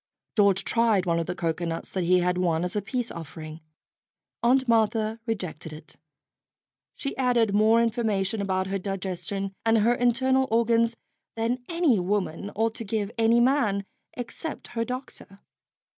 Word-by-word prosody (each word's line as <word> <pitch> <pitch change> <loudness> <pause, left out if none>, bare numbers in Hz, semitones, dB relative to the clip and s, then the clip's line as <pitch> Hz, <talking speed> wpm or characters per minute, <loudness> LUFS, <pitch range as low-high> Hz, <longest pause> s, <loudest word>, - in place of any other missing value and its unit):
George 200 -2 +4
tried 215 0 +2
one 170 -1 +1
of 165 - -3
the 180 - -3
cocoanuts 165 -1 -2
that 185 -2 -1
he 180 +1 +4
had 180 0 +1
won 170 -2 +1
as 180 +2 -3
a 210 - +1
peace 245 +4 -3
offering. 155 -1 -8 0.8
Aunt 260 +2 +3
Martha 225 -1 +2
rejected 175 -8 -4
it. 155 0 -12 1.0
She 275 - -4
added 240 -5 +2
more 220 +3 +5
information 220 -3 0
about 190 -1 0
her 195 +1 -2
digestion 195 0 -3
and 225 0 +4
her 225 +3 +4
internal 260 +2 +2
or 230 +1 +3
gans 230 0 +2 0.4
than 235 +2 -1
any 335 - +3
woman 195 0 -1
ought 225 +1 +1
to - - -5
give 210 -1 -2
any 230 +1 +4
man 235 -6 +2 0.3
except 250 +6 -6
her 230 -1 -2
doctor. 250 -5 -7
215 Hz, 155 wpm, -26 LUFS, 185-235 Hz, 1.0 s, more